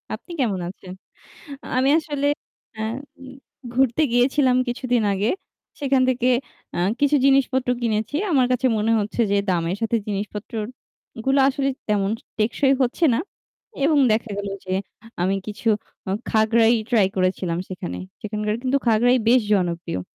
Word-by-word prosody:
আপনি 355 - -14
কেমন 205 -8 0
আছেন? 185 -1 -11 0.9
আমি 260 +2 +3
আসলে 290 -3 -2 0.5
অ্যা 220 0 -4 0.9
ঘুরতে 265 +3 +2
গিয়েছিলাম 255 +1 +3
কিছুদিন 245 -1 0
আগে। 200 +3 0 0.5
সেখান 270 -2 +2
থেকে 250 0 +1 0.5
আ - - -2 0.2
কিছু 290 +1 +4
জিনিসপত্র 265 -2 +3
কিনেছি। 220 +4 -1
আমার 265 -6 +4
কাছে 250 +1 +1
মনে 225 +2 +1
হচ্ছে 210 +3 -3
যে - - +3
দামের 175 +1 0
সাথে 225 +1 +1
জিনিসপত্রর 210 +2 -4 0.6
গুলো 270 +1 +3
আসলে 275 0 0 0.2
তেমন 200 -1 +1 0.3
টেকসই 265 +5 +2
হচ্ছে 260 +7 0
না। 260 - +1 0.6
এবং 300 0 +4
দেখা 225 +1 -1
গেল 200 - -3 0.2
যে 185 - -3 0.5
আমি 190 +2 +2
কিছু 210 +2 -8 0.4
আ- - - -1 0.2
খাগড়াই 225 +1 +4 0.2
ট্রাই 215 -5 +4
করেছিলাম 185 -2 0
সেখানে। 135 - -5 0.2
সেখানকার 210 0 -2
কিন্তু 265 +1 +2
খাগড়াই 240 +3 +4
বেশ 250 +2 +6
জনপ্রিয়। 170 - -1
230 Hz, 135 wpm, -22 LUFS, 205-260 Hz, 0.9 s, বেশ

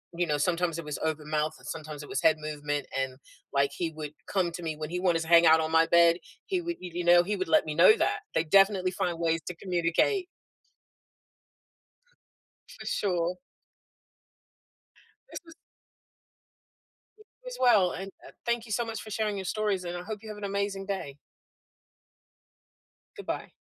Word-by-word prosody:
you 175 +1 +1
know, 150 -3 0
sometimes 170 +1 0
it 165 - -7
was 150 - -4
open 155 -1 -2
mouth, 155 0 0
and - - -13
sometimes 155 -2 -6
it 145 - -11
was - - -1
head 160 -1 +4
movement, 150 -1 -3
and, 130 -1 -3 0.4
like, 140 0 +3
he 165 +2 -3
would 150 -2 -7 0.2
come 185 -3 +1
to 170 +1 -7
me 160 -2 -3
when 155 0 -6
he 180 +1 -3
wanted 175 -3 +2
to 160 - -5
hang 170 0 +7
out 160 0 +7
on 160 0 -1
my 165 0 +5
bed. 170 0 +5 0.3
He 375 -4 0
would 340 0 -4
you 180 -1 -8
you 175 - -2
know, 175 0 +7
he 205 +3 -2
would 185 -3 -3
let 160 - +5
me 155 -1 -4
know 300 - +7
that. 415 +1 +1
They 160 - +2
definitely 195 +2 +4
find 175 -2 -2
ways 165 0 +1
to 180 - -4
communicate. 180 - +1 2.5
For - - -10
sure. 180 -3 -1 1.9
This - - -6
was 325 - -14 1.6
You 430 - -18 0.2
as - - -6
well, 205 -8 +5
and, 195 +1 -6
uh, - - -12
thank 235 -1 0
you 220 - -10
so 235 +3 0
much 225 -1 -5
for 215 - -10
sharing 215 -1 -1
your 190 - -5
stories, 205 -3 -1
and 175 0 -4
I 175 - -6
hope 215 +2 -6
you 220 - -10
have 210 - -7
an 205 - -10
amazing 200 -1 -2
day. 170 -8 -4 2.0
Goodbye. - - -5
175 Hz, 185 wpm, -28 LUFS, 160-200 Hz, 2.5 s, hang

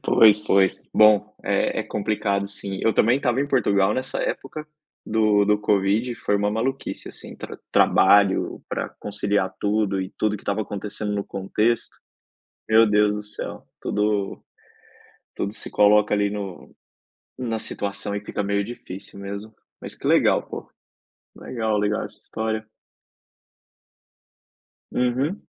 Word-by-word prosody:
Pois, 105 -2 +6
pois. 95 -2 +2
Bom, 105 0 +5
é - - +1
é - - -2
complicado 100 -1 -1
sim. 100 -1 -6
Eu 115 - +3
também 120 +4 +4
estava 130 -2 +1
em 145 - 0
Portugal 100 -7 +3
nessa 130 +1 -3
época 150 +3 -4 0.4
do 105 -2 +3
do 105 0 +3
covid, 105 +4 +1
foi 105 - 0
uma 105 0 +1
maluquice, 125 +5 -3
assim, - - -11
tra - - -8
trabalho, 100 -2 +4
pra - - -3
conciliar 100 -2 -1
tudo 100 -2 +1
e 95 +1 -4
tudo 105 -1 +1
que - - -15
estava 100 +2 -1
acontecendo 105 +1 -5
no 100 -1 -2
contexto. 105 +4 -1 0.7
Meu 110 +1 +6
Deus 105 0 +3
do 105 - -5
céu, 105 0 -7 0.2
tudo, 105 -1 -1 0.9
tudo 100 - -3
se - - -6
coloca 105 0 +4
ali 105 0 +2
no 100 -3 -7 0.6
na 120 -3 -2
situação 100 -1 -4
e 105 - -3
fica 105 - -3
meio 100 0 0
difícil 100 -3 -9
mesmo. 100 +2 -7 0.3
Mas - - -7
que - - -5
legal, - - +4
pô. - - -8 0.7
Legal, 110 -3 -2
legal 105 +1 0
essa - - -9
história. 110 0 -3 2.3
Uhum. 130 +9 0
105 Hz, 140 wpm, -23 LUFS, 100-110 Hz, 2.3 s, Pois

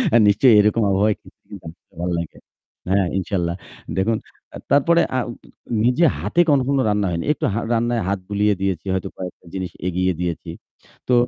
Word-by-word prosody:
আ - - +8
নিশ্চয়ই 110 +4 +5
এরকম 105 +2 +2
আবহাওয়ায় 100 +2 +2
খিচুড়ি - - -15
কিন্তু 80 +2 -11 0.2
ভালো 90 0 -1
লাগে। 85 - -6 0.5
হ্যাঁ, 95 -2 +3
ইনশাল্লাহ। 85 -2 -2 0.4
দেখুন, 110 +4 +1 0.4
আ - - -5
তারপরে 170 +5 +4 0.2
আ - - +2 0.7
নিজে 125 +7 +4
হাতে 175 - +2
কখনো 140 -1 +3
রান্না 105 -2 +1
হয়নি। 85 -1 -2
একটু - - -3
হা 115 - 0
রান্নায় 120 0 +1
হাত 100 0 0
বুলিয়ে 105 0 +2
দিয়েছি। 95 -3 -1
হয়তো 95 - -2
কয়েকটা 90 -1 -8
জিনিস 95 -1 -4 0.2
এগিয়ে 90 +1 +1
দিয়েছি। 85 -1 -3 0.6
তো 125 - +2
100 Hz, 165 wpm, -21 LUFS, 90-115 Hz, 0.7 s, আ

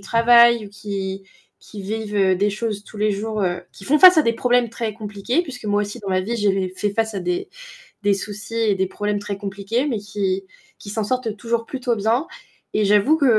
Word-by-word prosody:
travail 235 +1 +5
ou - - -11
qui 195 -1 -5 0.4
qui 210 - -10
vivent, 210 +1 -4
heu, 190 -2 +3
des 205 +3 +1
choses 210 -1 -3
tous 210 - -12
les 210 +1 +2
jours, 215 +2 -3
heu 180 -1 -1
qui 195 - -13
font 300 +8 +3
face 365 +1 +9
à - - +6
des 230 -3 +1
problèmes 245 0 +2
très 225 -1 -4
compliqués, 210 - -2
puisque 275 -8 -9
moi 205 0 +1
aussi 205 +3 -6
dans 200 -2 -5
ma 185 0 +2
vie, 225 +6 -3
j'ai 195 -3 +1
fait 205 +2 0
face 220 +1 -1
à 195 - -2
des 180 0 -2 0.6
des 205 0 +4
soucis 205 +2 -6
et 225 -3 +2
des 190 0 +1
problèmes 205 +2 -2
très 200 -1 -5
compliqués, 200 +5 -2
mais 235 -7 -1
qui 195 -1 -2 0.3
qui 205 - -10
s'en 215 +1 -2
sortent 240 -2 -2
toujours 230 +1 -2
plutôt 250 -1 -2
bien. 225 +8 0 0.5
Et 215 - +2
j'avoue 210 +9 +4
que, 285 - +2
210 Hz, 220 wpm, -21 LUFS, 200-230 Hz, 0.6 s, face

